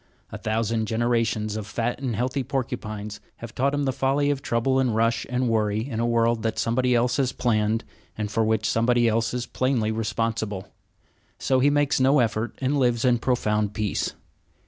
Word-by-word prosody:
A - - -5
thousand 110 0 -1
generations 110 -2 0
of 110 -2 -5
fat 120 +5 -2
and 125 -5 -2
healthy 130 +5 -1
porcupines 110 -6 -4 0.2
have 115 -1 -9
taught 140 +2 +1
him 145 - 0
the 135 - +1
folly 135 +2 +1
of 140 -1 -2
trouble 130 +3 +1
and 125 -4 +1
rush 115 0 +1
and 125 0 0
worry 110 0 0
in 115 -5 -4
a 120 - +1
world 115 -1 +2
that 110 0 -2
somebody 125 +2 +1
else 125 +2 +2
has 130 -2 +1
planned, 110 -1 0 0.3
and 105 -1 -3
for 115 - +1
which 110 -1 +1
somebody 120 +1 +2
else 115 0 +1
is 125 -1 -3
plainly 130 -4 0
responsible. 110 -2 -2 0.7
So 130 -1 +1
he 140 +3 +4
makes 145 -1 +2
no 135 +3 +4
effort 115 -2 0
and 140 +2 0
lives 120 -2 +2
in 120 -2 +3
profound 105 -5 0
peace. 105 -2 -2
115 Hz, 185 wpm, -25 LUFS, 110-130 Hz, 0.7 s, he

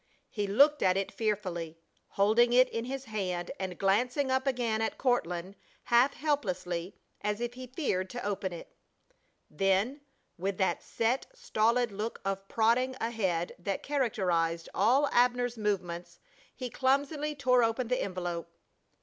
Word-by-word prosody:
He 205 -2 -2
looked 285 +9 +5
at 185 0 +3
it 195 - -1
fearfully, 185 -7 -2 0.4
holding 225 +4 +4
it 255 +1 +6
in 230 0 -3
his 270 +1 -5
hand 185 -6 -3
and 185 -2 -4
glancing 250 +8 +1
up 260 +1 +1
again 235 -4 0
at 225 - -1
Courtland 185 -7 0 0.3
half 245 +3 +4
helplessly, 185 - -2 0.3
as 210 +1 -1
if 240 0 -3
he 255 0 -8
feared 235 - -1
to 245 +1 -6
open 200 -2 -2
it. 170 - -10 0.7
Then, 195 - +1 0.4
with 195 +1 -2
that 190 - +1
set, 235 +4 -1
stolid 240 - +1
look 210 +3 -4
of 195 0 -2
prodding 240 +5 +2
ahead 190 -7 -1
that 195 +2 -3
characterized 180 - 0
all 270 +6 +4
Abner's 245 0 +2
movements 175 -4 -2 0.4
he 250 -2 -5
clumsily 285 +3 0
tore 250 -3 +3
open 230 +2 0
the 250 +1 0
envelope. 175 -3 -3
220 Hz, 140 wpm, -30 LUFS, 190-250 Hz, 0.7 s, it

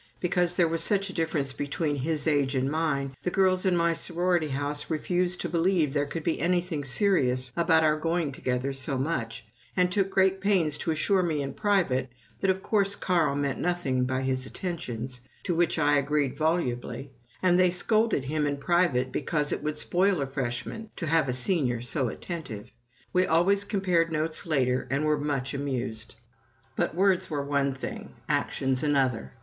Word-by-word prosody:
Because 180 -1 0
there 175 -2 +3
was 165 0 0
such 200 0 +1
a - - -13
difference 155 -5 -1
between 145 +1 -2
his 150 +2 -2
age 145 -3 +1
and 130 +1 0
mine, 145 -4 -1
the - - -1
girls 185 0 +2
in 180 -2 +3
my 170 0 +2
sorority 175 -1 +1
house 145 +1 -3
refused 175 +3 -1
to - - -2
believe 170 -4 +1
there 145 -1 0
could 160 +2 -5
be 165 - -1
anything 175 -2 0
serious 130 -4 +1
about 165 -1 +3
our 155 0 +3
going 165 -2 -1
together 130 +1 -2
so 135 +1 +2
much, 130 -6 -3 0.3
and 180 0 +3
took 195 0 +1
great 190 0 +2
pains 185 -7 +2
to - - -3
assure 175 +5 +2
me 155 -5 -1
in 135 - -5
private 185 - +1 0.3
that 195 - 0
of 190 0 0
course 200 -2 +1
Carl 170 -6 +1
meant 140 -2 -1
nothing 155 -8 0
by 130 +1 -1
his 130 -1 0
attentions, 130 -9 -5 0.2
to 180 - -1
which 170 0 +1
I 145 -2 +3
agreed 145 -1 0
volubly, 140 -4 -2 0.3
and 180 -1 +4
they 180 -1 +5
scolded 215 - +2
him 150 +2 -1
in 145 0 -2
private 140 -5 +1
because 150 -3 -1
it - - -2
would 150 0 -3
spoil 185 +3 +2
a 140 - 0
Freshman 135 - -4
to 170 - -4
have 155 -3 +2
a - - 0
Senior 125 -2 +2
so 125 +2 -2
attentive. 125 - -6 0.4
We 185 0 +3
always 190 +5 +3
compared 185 -5 +1
notes 155 +1 0
later, 130 -5 +1
and 140 +3 0
were 150 -1 +1
much 140 -3 -2
amused. 125 -6 -4 0.6
But - - -1
words 190 0 +2
were 145 -3 -2
one 140 -1 0
thing, 135 - -7
actions 130 -1 0
another. 130 - 0
155 Hz, 180 wpm, -27 LUFS, 135-180 Hz, 0.6 s, they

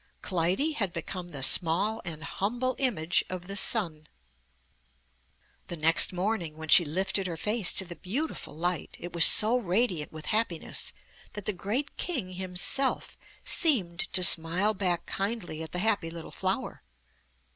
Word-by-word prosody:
Clytie 185 - 0
had 200 -11 -2
become 180 -2 -7
the 140 -6 -6
small 185 +10 +3
and 160 -3 -7
humble 240 +9 -3
image 205 - 0
of 185 -1 -7
the 195 +2 -7
sun. 170 -8 +1 1.6
The 175 - -6
next 160 +2 +5
morning, 180 -4 -3
when 160 0 -9
she 175 - +7
lifted 190 +4 -2
her 170 -2 -6
face 210 +2 +1
to 190 - +1
the 175 -1 -9
beautiful 240 - -5
light, 175 0 -3
it 175 - -9
was 170 -1 +8
so 225 +3 +5
radiant 185 -6 -1
with 155 -1 -10
happiness 210 -7 -2 0.4
that 210 - -8
the 210 - -1
great 210 +10 -4
King 255 - -3
himself 185 +9 +1 0.3
seemed 195 - +2
to 185 - +2
smile 175 +5 +4
back 180 -4 -2
kindly 195 -6 -4
at 160 - -8
the - - -3
happy 200 -3 0
little 165 -1 -9
flower. - - -4
185 Hz, 150 wpm, -27 LUFS, 170-215 Hz, 1.6 s, was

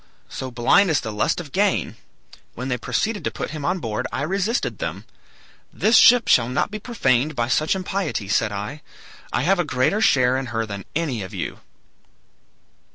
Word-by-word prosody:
So 130 - -5
blind 125 +11 +3
is 155 - +2
the 110 -3 -5
lust 105 +9 0
of 155 -5 -8
gain! 200 +4 0 0.6
When 125 +3 -5
they 125 - 0
proceeded 215 - -2
to - - 0
put - - -5
him 155 -2 -6
on 180 +6 0
board 110 -10 -3
I 140 - -2
resisted 195 +8 -1
them. - - -5 0.7
'This 220 +2 +2
ship 245 -1 +7
shall 120 -1 +4
not 125 - -1
be 215 - -5
profaned 150 - 0
by 120 -2 0
such 155 +6 +2
impiety,' 185 - -3
said 105 +2 +1
I. 105 +9 -5 0.5
'I - - 0
have 190 +4 +2
a - - +3
greater 145 +8 0
share 130 - +3
in 135 -1 -4
her 115 -1 -2
than 100 -2 -7
any 150 -9 -1
of 95 - -7
you.' - - -5
145 Hz, 185 wpm, -22 LUFS, 120-190 Hz, 0.7 s, ship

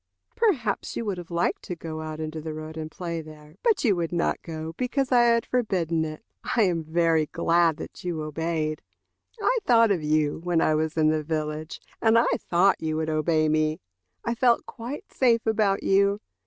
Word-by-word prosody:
Perhaps 285 - 0
you 230 - -3
would 195 -4 -2
have 175 - -9
liked 170 0 0
to 180 - -6
go 160 -1 -6
out 155 0 -6
into 155 0 -4
the 155 0 -5
road 155 0 -7
and 155 -1 -5
play 170 0 -4
there, 155 -1 -13
but 445 -5 +2
you 215 -7 +3
would 170 -2 -2
not 170 -1 0
go 160 -1 -6
because 255 +3 -1
I 240 -1 +5
had 235 -1 +3
forbidden 180 -10 0
it. 155 +8 -8 0.3
I 230 - +4
am 175 -4 +1
very 160 -1 +2
glad 165 -1 +2
that - - -9
you 170 -3 -3
obeyed. 155 0 -2 0.6
I - - +2
thought 230 - +5
of 180 -5 +1
you 150 0 +1
when 175 0 0
I 155 - +3
was 155 +1 -1
in 155 -1 +4
the 155 0 +1
village, 155 0 -4 0.2
and 225 0 +4
I 230 - +5
thought 180 +3 +2
you 155 -1 -1
would 160 0 -1
obey 155 0 +2
me. 155 0 +1 0.5
I 235 - 0
felt 235 0 +2
quite 245 +5 -8
safe 235 -3 +3
about 210 -3 +1
you. 200 +1 +3
165 Hz, 195 wpm, -26 LUFS, 155-215 Hz, 0.6 s, I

